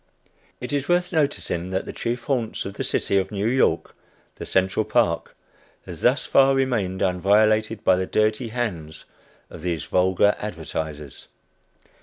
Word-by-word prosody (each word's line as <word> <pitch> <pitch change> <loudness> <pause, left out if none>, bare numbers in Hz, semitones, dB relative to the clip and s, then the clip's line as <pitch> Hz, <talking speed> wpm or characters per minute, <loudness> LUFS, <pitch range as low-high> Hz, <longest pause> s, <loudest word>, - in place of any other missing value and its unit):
It 125 +3 -6
is 145 +1 -2
worth 175 +1 +1
noticing 140 - -1
that 95 0 -2
the - - -7
chief 115 0 -3
haunts 120 -5 -2
of 100 - -5
the - - -4
city 100 - +1
of 95 0 -3
New 100 0 -3
York, 130 +3 +1 0.4
the - - -7
Central 95 0 +1
Park, - - 0 0.5
has - - -9
thus - - +2
far 135 0 +4
remained 110 -9 0
unviolated 105 +4 +2
by 95 -3 +4
the 95 0 -2
dirty 110 +3 +1
hands 90 -10 -4 0.5
of - - -10
these 85 -2 -2
vulgar 95 +2 +2
advertisers. 80 -7 -6
105 Hz, 150 wpm, -23 LUFS, 90-120 Hz, 0.5 s, far